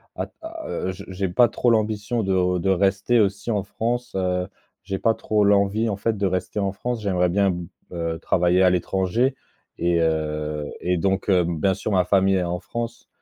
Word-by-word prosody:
à - - -2
t - - -21
à, 325 0 -7
heu 95 - -2
je 95 +1 -9
j'ai 95 +1 -2
pas 120 +7 +5
trop 120 - +1
l'ambition 110 0 0
de 90 -2 +1
de 90 +2 -1
rester 95 +5 +2
aussi 100 +2 0
en 105 -2 +1
France, 120 +5 -3
heu, 90 -1 0 0.4
j'ai 95 +1 -3
pas 115 +3 +2
trop 105 -1 +1
l'envie 100 +2 +3
en 100 - -2
fait 110 +1 -1
de 100 - 0
rester 95 +2 -2
en 100 -1 0
France. 120 +3 -3
J'aimerais 90 -3 +1
bien 100 +2 +2
b 90 -1 -5 0.2
heu, 85 -2 -3
travailler 90 +1 +2
à 90 - +5
l'étranger 95 +8 +1 0.4
et 85 0 +1
heu 75 -2 -1 0.2
et 90 0 +1
donc 95 +4 0
heu, 90 -3 +4
bien 85 +3 +1
sûr 105 - -4
ma 90 -2 +3
famille 95 0 +3
est 90 - 0
en 85 0 -2
France, 120 0 -6
95 Hz, 205 wpm, -23 LUFS, 90-105 Hz, 0.4 s, pas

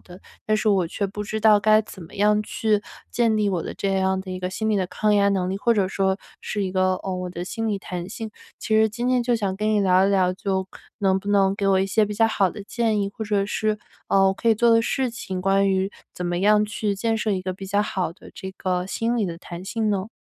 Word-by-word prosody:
的， 180 +1 -14 0.3
但 215 - +2
是 215 0 0
我 190 -4 +3
却 200 +4 -2
不 205 +2 -5
知 215 +1 -3
道 215 -1 +6
该 215 +1 +5
怎 190 -3 -11
么 165 - -13
样 210 +1 +3
去 210 -1 0 0.3
建 230 -2 +2
立 210 -1 +2
我 180 -4 -1
的 - - -5
这 195 -1 -1
样 190 0 +1
的 190 - -8
一 185 - -4
个 180 0 -3
心 220 +3 -2
理 210 - +2
的 185 - 0
抗 210 +3 +1
压 200 0 +4
能 185 -2 0
力， 195 - -2
或 235 +4 +3
者 195 -3 +1
说 190 0 0 0.2
是 205 - -2
一 185 - -2
个， 185 0 +2
哦， 190 -1 -3
我 180 0 -4
的 175 0 -5
心 225 +4 -3
理 205 -2 -1
弹 180 -2 -6
性。 225 +1 -6 0.3
其 220 - -1
实 220 0 +5
今 240 +3 -2
天 255 -1 +2
就 240 0 +1
想 195 -4 -2
跟 215 +1 0
你 210 - +3
聊 190 0 +4
一 - - +1
聊， 185 -2 +3
就 190 -1 -2 0.3
能 190 -2 +2
不 200 - -8
能 195 -1 +3
给 200 - -1
我 190 -1 +4
一 190 - +1
些 210 +3 +3
比 210 - -4
较 225 +2 +4
好 195 -4 +2
的 205 - -8
建 220 0 0
议？ 200 0 -1
或 220 - -4
者 205 -2 +1
是， 215 +1 -1 0.3
呃， 195 0 +4
我 190 - 0
可 - - -7
以 225 - +6
做 235 +2 +3
的 230 0 +5
事 260 +2 0
情， 190 -5 -5
关 195 +1 +3
于 190 +1 +1 0.2
怎 180 - -5
么 175 0 -1
样 210 +2 +4
去 210 -1 -2
建 225 +3 0
设 215 0 -1
一 190 -2 0
个 185 0 -3
比 195 - -9
较 200 +2 +1
好 185 -5 -2
的 - - -15
这 190 0 -7
个 180 -1 -1
心 230 +4 -1
理 225 - +1
的 170 - -5
弹 175 0 -9
性 220 +2 -1
呢？ 195 0 -1
200 Hz, 295 characters per minute, -23 LUFS, 190-215 Hz, 0.3 s, 道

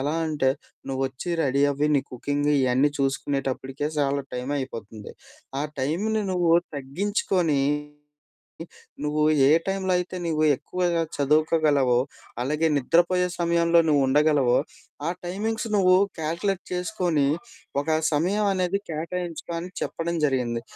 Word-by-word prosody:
ఎలా 145 +4 -1
అంటే, 145 -4 +1 0.4
నువ్వొచ్చి 135 +5 -3
రెడీ 140 +1 +2
అవ్వి. 145 +2 0
నీ 135 - +1
కుకింగ్ 145 +4 -1
ఇయన్నీ 130 +2 +3
చూసుకునేటప్పటికే 135 +1 -2
చాలా 140 0 +1
టైమయిపోతుంది. 125 -5 -5 0.5
ఆ - - -1 0.2
టైంని 210 +10 0
నువ్వు 175 -2 +2 0.2
తగ్గించుకొని, 165 +1 0 1.4
నువ్వు 150 +1 0 0.2
ఏ - - +5 0.2
టైంలో 190 -1 -1
అయితే 180 +1 -4
నువ్వు 155 -1 0
ఎక్కువగా 175 +1 -1 0.2
చదువుకోగలవో, 150 -3 +3 0.5
అలాగే 150 +5 0
నిద్రపోయే 175 +6 +2
సమయంలో 170 0 +3
నువ్వు 145 -2 +4
ఉండగలవో, 145 -3 +3 0.5
ఆ - - +1
టైమింగ్స్ 220 +6 -2
నువ్వు 185 -1 +5 0.2
కాలిక్యులేట్ 170 +5 -1
చేసుకొని, 180 -5 0 0.6
ఒక 145 - -12 0.2
సమయమనేది 190 +3 +1
కేటాయించుకో." 170 +1 -4
అని 180 +2 -7
చెప్పడం 170 0 -2
జరిగింది. 120 -4 -1
155 Hz, 110 wpm, -25 LUFS, 135-180 Hz, 1.4 s, ఏ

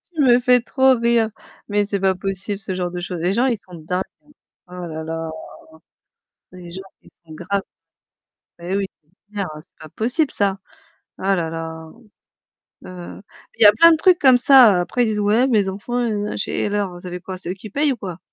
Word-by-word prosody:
Tu 300 - +1
me 245 -2 +5
fais 250 0 +4
trop 265 +2 +3
rire, 235 -1 +2 0.4
mais 205 0 +1
c'est 200 -1 -2
pas 190 -1 +2
possible 195 +2 -4
ce 190 -2 -5
genre 180 -1 -3
de 180 - -5
choses. 175 -1 -5
Les 175 +3 0
gens 240 +5 +2
ils 240 -4 +1
sont 180 -3 -14
dingues. 180 +4 -3 0.6
Oh 180 - -15
là 165 -3 -6
là. 165 0 -4 1.2
Les 180 -2 -11
gens 190 +2 -7 0.2
ils - - -19
sont 160 - -14
graves. 195 +4 -2 1.0
Mais, 175 +3 -3
oui, 200 - -1 0.2
c'est 190 +7 -36
clair, 200 -2 -2
hein, 150 - -9
c'est 175 - -29
pas 155 - -11
possible 255 - 0
ça. 195 -1 0 0.6
Oh - - -11
là 185 -4 +1
là. 160 0 -7 1.0
Heu, 180 0 -9 0.4
il - - -11
y - - +8
a 205 - +10
plein 335 +9 +7
de 320 - +3
trucs 360 +2 +4
comme 260 -3 +6
ça. 245 -8 +6
Après 245 +7 0
ils - - -1
disent: 215 -1 -1
«Ouais, 215 +5 +3
mes 210 -6 +2
enfants 205 +6 -4
nanana», 210 -3 -2
je - - -1
fais: - - -3
«Et - - 0
alors, 205 -2 -1
vous 175 - -13
avez 180 0 -6
quoi? 185 +1 -7
C'est 180 - -8
eux - - -1
qui 195 +3 -11
payent 285 +5 +1
ou - - -9
quoi?» 185 -5 -7
195 Hz, 220 wpm, -20 LUFS, 180-235 Hz, 1.2 s, a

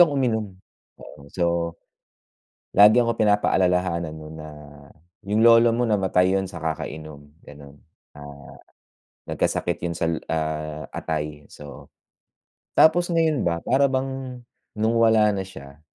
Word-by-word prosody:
akong 160 -5 +5
uminom, 110 -5 0 0.5
oo. 70 - -13
So, 90 - -1 1.3
lagi 105 +4 +7
ako 115 -1 -1
pinapaalalahanan 90 -6 +1
no'n 80 0 -10
na, 75 0 -9 0.8
"Yung 110 +2 +1
lolo 115 0 +6
mo 120 - +1
namatay 95 -2 +2
yun 95 - -3
sa 90 - -11
kakainom," 75 -2 -6
gano'n. 70 -1 -14 0.4
Ah, 70 -1 -12 0.8
"Nagkasakit 85 0 -1
yun 85 - -2
sal 85 -2 -1
ah, 75 -1 -3
atay." 75 -1 -5
So, 70 -3 -12 0.9
tapos 175 +2 +5
ngayon 160 -3 +1
ba 85 -1 0
para 135 +2 +3
bang 130 -1 -4 0.4
no'ng 110 +2 +1
wala 110 -2 +4
na 95 - -2
siya, 70 -5 -13
90 Hz, 125 wpm, -23 LUFS, 75-115 Hz, 1.3 s, lagi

